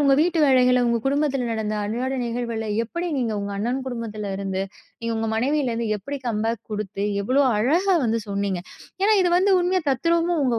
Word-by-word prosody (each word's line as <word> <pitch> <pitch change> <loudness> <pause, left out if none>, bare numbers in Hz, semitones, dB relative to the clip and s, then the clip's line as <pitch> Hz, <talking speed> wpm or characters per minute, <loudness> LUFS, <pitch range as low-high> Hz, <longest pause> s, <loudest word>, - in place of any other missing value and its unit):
உங்க 275 -2 +5
வீட்டு 340 +1 +2
வேலைகளை, 250 -2 +4
உங்க 235 0 +2
குடும்பத்தில 275 -2 +1
நடந்த 220 -1 -2
அன்றாட 240 +6 -2
நிகழ்வுகள, 235 -2 -3 0.2
எப்படி 340 +8 -4
நீங்க 235 -3 0
உங்க 200 0 -4
அண்ணன் 245 +6 -1
குடும்பத்தில 220 -5 -4
இருந்து, 195 -1 -2 0.4
நீங்க 230 0 -2
உங்க 225 0 -1
மனைவியில 270 +3 +1
இருந்து, 230 -1 -2
எப்படி 280 +9 -5
கம் 220 -3 -1
பேக் 230 0 -2
குடுத்து 205 -1 -3 0.2
எவ்வளோ 255 +7 +3 0.2
அழகா 340 - +3
வந்து 230 0 +1
சொன்னீங்க. 200 -3 -2 0.4
ஏன்னா 425 +2 +5
இது 355 - +2
வந்து 385 +2 +3
உண்மையா, 360 +1 +1
தத்ரூபமா 335 +6 +1
உங்க 240 -3 +1
240 Hz, 180 wpm, -23 LUFS, 220-285 Hz, 0.4 s, உங்க